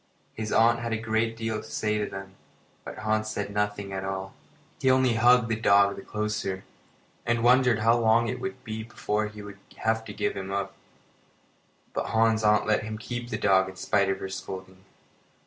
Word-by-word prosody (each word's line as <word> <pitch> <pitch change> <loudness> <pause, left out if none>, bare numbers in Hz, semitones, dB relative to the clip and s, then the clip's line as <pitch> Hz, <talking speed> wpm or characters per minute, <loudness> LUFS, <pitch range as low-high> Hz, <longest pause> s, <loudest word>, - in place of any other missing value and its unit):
His 110 -1 -4
aunt 115 +1 +4
had 115 -1 -3
a - - +1
great 115 0 -1
deal 110 -1 -2
to 110 - -13
say 105 0 -1
to 105 - -2
them, 95 0 -8 0.5
but - - -8
Hans 110 0 0
said 100 -1 -3
nothing 105 -1 -2
at 95 0 -3
all. 95 0 -4 0.5
He 130 - +2
only 130 -2 +4
hugged 120 +1 +5
the 110 - 0
dog 100 -2 +4
the - - -8
closer, 105 -3 -3 0.6
and 120 0 0
wondered 125 -1 +5
how 115 +2 +3
long 115 +1 +3
it 125 +1 -3
would 130 0 -5
be 110 -3 -5
before 110 -1 -2
he 105 0 -10
would 100 0 -10 0.2
have 110 0 0
to 105 - -7
give - - -1
him 95 -1 -6
up. 100 -1 -2 1.2
But - - -2
Hans's 110 0 +2
aunt 105 0 +4
let 110 0 +2
him 110 0 -5
keep 120 +2 -5
the 110 - -2
dog 95 -2 +3
in 95 - -11
spite 100 +1 +1
of 95 0 -1
her 95 - -4
scolding. 95 0 -8
110 Hz, 200 wpm, -27 LUFS, 100-115 Hz, 1.2 s, hugged